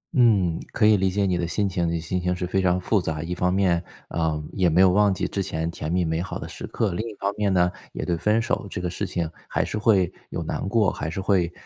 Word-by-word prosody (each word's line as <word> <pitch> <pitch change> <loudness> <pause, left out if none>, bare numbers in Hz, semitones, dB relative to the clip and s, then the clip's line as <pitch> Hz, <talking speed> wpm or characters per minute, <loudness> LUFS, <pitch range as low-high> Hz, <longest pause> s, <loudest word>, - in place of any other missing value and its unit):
嗯， 100 - +4
可 110 - +2
以 110 0 +7
理 95 -1 +2
解 100 +2 0
你 90 -2 +1
的 85 - -1
心 100 +4 0
情， 85 -2 -1
你 85 - -1
的 85 - -1
心 90 +3 -2
情 90 +1 0
是 90 - -3
非 95 +2 0
常 90 -1 +2
复 100 +2 +1
杂。 80 -2 -3
一 85 +2 -3
方 90 0 +1
面， 90 -3 +2 0.3
嗯， 80 -2 -1
也 95 -3 +2
没 85 +2 +2
有 95 -1 +7
忘 105 +2 +4
记 95 - -1
之 100 - -2
前 85 -3 -2
甜 80 -1 -5
蜜 90 0 +1
美 80 +1 -1
好 95 - -4
的 - - -7
时 - - -7
刻， 105 -6 -1
另 85 - -4
一 105 - -10
方 100 0 -2
面 105 -2 +1
呢， 90 -1 +3 0.2
也 - - -4
对 85 - 0
分 105 +6 +2
手 115 -2 -1
这 - - -4
个 90 - -2
事 100 +2 -3
情 85 -2 -2 0.2
还 - - 0
是 - - -4
会 100 -4 +3 0.2
有 - - -4
难 - - -3
过， 105 -2 +3
还 75 - -4
是 80 - -4
会， 95 -3 +1
90 Hz, 300 characters per minute, -24 LUFS, 85-100 Hz, 0.3 s, 以